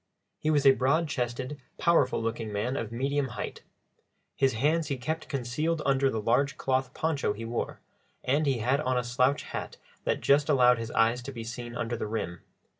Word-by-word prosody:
He 155 Hz, -, -1 dB
was 145 Hz, -2 st, +3 dB
a 135 Hz, -, +10 dB
broad 140 Hz, +6 st, +2 dB
chested, 130 Hz, +1 st, -3 dB, 0.2 s
powerful 165 Hz, -7 st, +3 dB
looking 115 Hz, -1 st, -3 dB
man 110 Hz, +6 st, -1 dB
of 115 Hz, -4 st, -3 dB
medium 135 Hz, +3 st, 0 dB
height; -, -, -5 dB, 0.7 s
his 135 Hz, -1 st, +2 dB
hands 150 Hz, +7 st, +1 dB
he 140 Hz, -3 st, -2 dB
kept 155 Hz, +6 st, -4 dB
concealed 150 Hz, +5 st, -1 dB
under 135 Hz, 0 st, +3 dB
the 115 Hz, -, -2 dB
large 125 Hz, +5 st, +1 dB
cloth 130 Hz, -1 st, 0 dB
poncho 155 Hz, -9 st, 0 dB
he 115 Hz, +2 st, -7 dB
wore, 115 Hz, +1 st, -3 dB, 0.4 s
and 145 Hz, +4 st, +1 dB
he 135 Hz, -3 st, +2 dB
had 130 Hz, +6 st, +1 dB
on 130 Hz, -2 st, 0 dB
a 125 Hz, -, +1 dB
slouch 125 Hz, +3 st, +1 dB
hat -, -, -6 dB, 0.3 s
that -, -, 0 dB
just 145 Hz, +2 st, +3 dB
allowed 125 Hz, -4 st, +5 dB
his 115 Hz, 0 st, -4 dB
eyes 115 Hz, +1 st, +2 dB
to 140 Hz, -, -7 dB
be 115 Hz, -3 st, -6 dB
seen 120 Hz, +1 st, -6 dB
under 120 Hz, 0 st, -2 dB
the 110 Hz, -, -3 dB
rim. 90 Hz, -6 st, -4 dB
130 Hz, 190 wpm, -28 LUFS, 120-140 Hz, 0.7 s, a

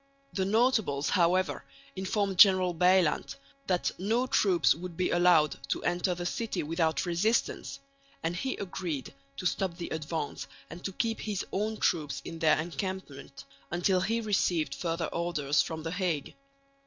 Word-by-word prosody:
The 190 Hz, -, 0 dB
notables 215 Hz, -, +2 dB
however 185 Hz, 0 st, +2 dB, 0.3 s
informed 195 Hz, 0 st, -1 dB
General 185 Hz, -3 st, +7 dB
Bylandt 180 Hz, -1 st, +2 dB, 0.3 s
that 180 Hz, -2 st, +1 dB
no 225 Hz, +7 st, +1 dB
troops 180 Hz, -, +3 dB
would 170 Hz, +1 st, -8 dB
be 185 Hz, -, 0 dB
allowed 175 Hz, -4 st, +4 dB
to -, -, -1 dB
enter 180 Hz, +1 st, 0 dB
the 175 Hz, 0 st, -5 dB
city 225 Hz, +2 st, -2 dB
without 160 Hz, 0 st, 0 dB
resistance; 175 Hz, -, 0 dB, 0.4 s
and 165 Hz, +1 st, -1 dB
he 260 Hz, +8 st, -2 dB
agreed 175 Hz, -7 st, -4 dB, 0.2 s
to 180 Hz, -, -6 dB
stop 180 Hz, -1 st, -1 dB
the 175 Hz, -, -5 dB
advance 160 Hz, -1 st, -4 dB, 0.2 s
and 170 Hz, +2 st, -9 dB
to 195 Hz, -, -2 dB
keep 225 Hz, +4 st, -1 dB
his 210 Hz, -3 st, -3 dB
own 215 Hz, +2 st, -1 dB
troops 145 Hz, -8 st, 0 dB
in 165 Hz, -1 st, -7 dB
their 155 Hz, -2 st, +4 dB
encampment 165 Hz, -5 st, -6 dB, 0.2 s
until 180 Hz, +2 st, +1 dB
he 230 Hz, +4 st, 0 dB
received 175 Hz, -9 st, +1 dB
further 165 Hz, +1 st, -2 dB
orders 150 Hz, -5 st, +1 dB
from 160 Hz, +2 st, -5 dB
the 165 Hz, -, -3 dB
Hague. 180 Hz, -6 st, -2 dB
175 Hz, 150 wpm, -29 LUFS, 160-190 Hz, 0.4 s, General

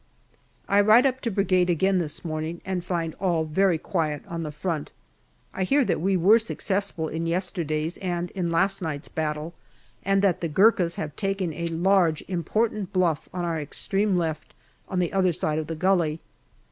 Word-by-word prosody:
I 200 Hz, +1 st, +4 dB
ride 215 Hz, +5 st, +6 dB
up 260 Hz, -1 st, +1 dB
to 235 Hz, -, -1 dB
Brigade 190 Hz, -3 st, +2 dB
again 190 Hz, +3 st, +2 dB
this 160 Hz, 0 st, -2 dB
morning 160 Hz, +1 st, -3 dB
and 185 Hz, -2 st, -2 dB
find 170 Hz, -3 st, -2 dB
all 175 Hz, -4 st, +1 dB
very 175 Hz, +3 st, +2 dB
quiet 155 Hz, -3 st, -2 dB
on 170 Hz, -1 st, -4 dB
the 155 Hz, -2 st, -4 dB
front. 155 Hz, 0 st, -3 dB, 0.6 s
I -, -, -4 dB
hear 275 Hz, +8 st, +3 dB
that -, -, 0 dB
we 190 Hz, +1 st, +2 dB
were 200 Hz, +6 st, +6 dB
successful 200 Hz, -6 st, -2 dB
in 165 Hz, +2 st, -3 dB
yesterday's 165 Hz, -2 st, -2 dB
and 175 Hz, -2 st, -3 dB
in 180 Hz, -3 st, -2 dB
last 190 Hz, +4 st, +1 dB
night's 155 Hz, -3 st, -4 dB
battle, 155 Hz, +1 st, -3 dB, 0.5 s
and 195 Hz, 0 st, +1 dB
that 190 Hz, -4 st, +2 dB
the 170 Hz, -, 0 dB
Gurkhas 185 Hz, 0 st, +3 dB
have 150 Hz, -2 st, -5 dB
taken 195 Hz, -4 st, -1 dB
a 170 Hz, +3 st, -3 dB
large 170 Hz, -1 st, +2 dB
important 205 Hz, +3 st, -1 dB
bluff 175 Hz, -6 st, 0 dB
on 180 Hz, -1 st, -3 dB
our 165 Hz, -2 st, -1 dB
extreme 195 Hz, +6 st, 0 dB
left 160 Hz, -3 st, -3 dB, 0.3 s
on 185 Hz, -, -3 dB
the 180 Hz, +1 st, 0 dB
other 185 Hz, -2 st, +2 dB
side 155 Hz, 0 st, -1 dB
of 155 Hz, -, -4 dB
the 165 Hz, -, -4 dB
gully. 170 Hz, -3 st, +1 dB
175 Hz, 180 wpm, -25 LUFS, 160-195 Hz, 0.6 s, ride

